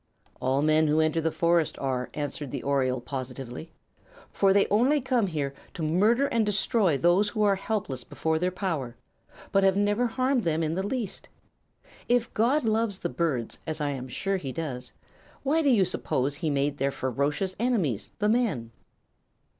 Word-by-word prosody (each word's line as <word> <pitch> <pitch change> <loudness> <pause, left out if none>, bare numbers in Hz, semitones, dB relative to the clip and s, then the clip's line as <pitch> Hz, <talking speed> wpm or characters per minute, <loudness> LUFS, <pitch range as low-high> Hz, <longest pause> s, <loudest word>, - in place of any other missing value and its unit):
"All 135 +2 +1
men 155 0 +4
who 150 +1 +2
enter 160 +1 +2
the 160 0 0
forest 170 -1 +1
are," 130 -2 -2
answered 145 -1 -4
the 135 0 -5
oriole, 130 -2 +1
positively. 130 +3 -6 0.6
"For 195 -1 +3
they 200 +1 +4
only 255 +8 +4
come 250 -5 +1
here 145 -5 -2 0.2
to 165 - -4
murder 210 - +3
and 230 -5 +1
destroy 205 -5 +2
those 175 +6 +3
who 215 +1 -1
are 205 -1 +4
helpless 190 - -3
before 160 +4 -1
their 180 +2 +1
power, 165 - -3 0.6
but 195 - +3
have 195 0 +4
never 205 +4 +2
harmed 255 +1 0
them 165 -1 0
in 155 0 -1
the 185 - -1
least. 205 -1 -4 0.8
If 240 -1 +2
God 255 +7 +2
loves 220 -2 +1
the - - -3
birds, 130 -4 -2
as 155 0 -3
I 145 -1 0
am 130 -2 -5
sure 195 +10 -1
He 140 -7 -5
does, 130 -5 -5 0.5
why 300 +4 +2
do 290 - +3
you 215 -7 +4
suppose 130 -4 -1
He 160 -1 -1
made 145 0 0
their 135 +1 +2
ferocious 140 - -1
enemies, 195 - 0
the 210 0 +1
men?" 205 - 0
165 Hz, 175 wpm, -27 LUFS, 140-210 Hz, 0.8 s, men